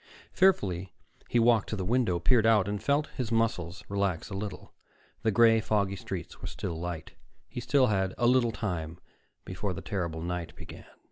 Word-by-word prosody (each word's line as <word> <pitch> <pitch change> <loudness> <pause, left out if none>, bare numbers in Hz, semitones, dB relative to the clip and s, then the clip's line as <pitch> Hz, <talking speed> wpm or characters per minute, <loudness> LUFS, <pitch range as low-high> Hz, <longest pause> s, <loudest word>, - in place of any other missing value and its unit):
Fearfully, 95 - +2 0.3
he - - +1
walked 115 -2 +4
to - - -2
the 95 -3 -3
window, 115 -4 +2
peered 110 +6 +3
out, 105 -4 +4
and 105 0 -3
felt 145 +2 +1
his 125 -4 -3
muscles 105 -6 0
relax 100 -2 -1
a - - -4
little. 100 0 -6 0.5
The 110 - +2
gray, 115 +1 +5
foggy 100 -2 0
streets 90 - -7
were - - -5
still 80 - -5
light. 85 -2 -5 0.4
He - - -6
still 135 +1 +3
had 95 -5 0
a 120 - +1
little 120 -1 +4
time 85 -7 -4 0.5
before 95 +1 -3
the - - -6
terrible 85 -5 -3
night 90 -1 -4
began. - - -11
100 Hz, 180 wpm, -29 LUFS, 90-115 Hz, 0.5 s, gray